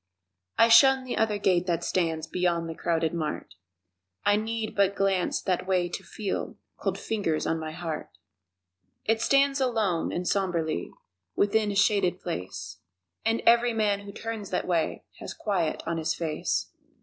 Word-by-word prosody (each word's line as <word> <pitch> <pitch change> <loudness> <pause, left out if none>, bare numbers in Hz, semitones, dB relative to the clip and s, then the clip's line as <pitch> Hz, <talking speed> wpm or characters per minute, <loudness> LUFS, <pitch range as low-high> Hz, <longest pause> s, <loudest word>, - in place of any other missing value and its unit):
I 230 - +6
shun 265 +3 +7
the 255 - -4
other 220 -2 +1
gate 180 -3 +2
that 170 -1 0
stands 165 -4 0
Beyond 175 -2 0
the 165 - -4
crowded 165 -1 0
mart 155 -3 -4 0.7
I 205 - +5
need 220 +1 -3
but 200 -1 +3
glance 195 -2 +1
that 185 -1 -1
way 180 -2 +1
to - - -6
feel 205 -3 -4 0.2
Cold - - -2
fingers 195 -8 -1
on 165 - 0
my 155 0 -5
heart! 160 -2 -5 1.0
It 225 0 +1
stands 275 +1 +3
alone 220 -9 +1
and 175 0 -3
somberly 170 - 0 0.5
Within 205 +1 +2
a - - -4
shaded 195 -3 +3
place, 95 - -6 0.5
And 225 +1 0
every 235 0 +5
man 210 -2 +1
who 200 0 -9
turns 220 -1 -6
that 180 - -1
way 170 -3 0 0.2
Has - - -7
quiet 180 -7 -1
on 165 0 -2
his 160 +1 -1
face. 160 -2 -2
190 Hz, 160 wpm, -27 LUFS, 165-220 Hz, 1.0 s, shun